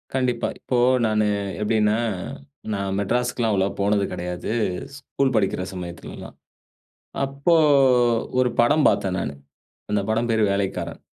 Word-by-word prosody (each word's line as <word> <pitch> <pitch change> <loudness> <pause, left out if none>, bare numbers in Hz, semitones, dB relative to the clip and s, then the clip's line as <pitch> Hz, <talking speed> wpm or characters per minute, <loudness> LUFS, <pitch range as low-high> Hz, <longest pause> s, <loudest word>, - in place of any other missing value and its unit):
கண்டிப்பா. 125 -2 0
இப்போ, 125 - -2 0.3
நானு 110 -1 +2 0.4
எப்டினா 105 0 +2 0.8
நான் 100 -1 -2
மெட்ராஸ்க்குலாம், 120 +1 0
அவ்ளவா 95 0 +1
போனது 100 0 +2
கெடையாது. 90 +2 -4 0.5
ஸ்கூல் 135 -2 -1
படிக்கிற 95 -3 +1
சமயத்துலலாம். 85 -1 -8 0.9
அப்போ 140 +5 +1 0.8
ஒரு 125 -1 +3
படம் 145 +6 +4
பாத்தேன், 95 -2 +1
நானு. 70 - -3 0.6
அந்த 105 -1 +1
படம் 115 +2 0
பேரு 110 -1 +2
வேலைக்காரன். 100 -1 -3
105 Hz, 115 wpm, -23 LUFS, 95-125 Hz, 0.9 s, படம்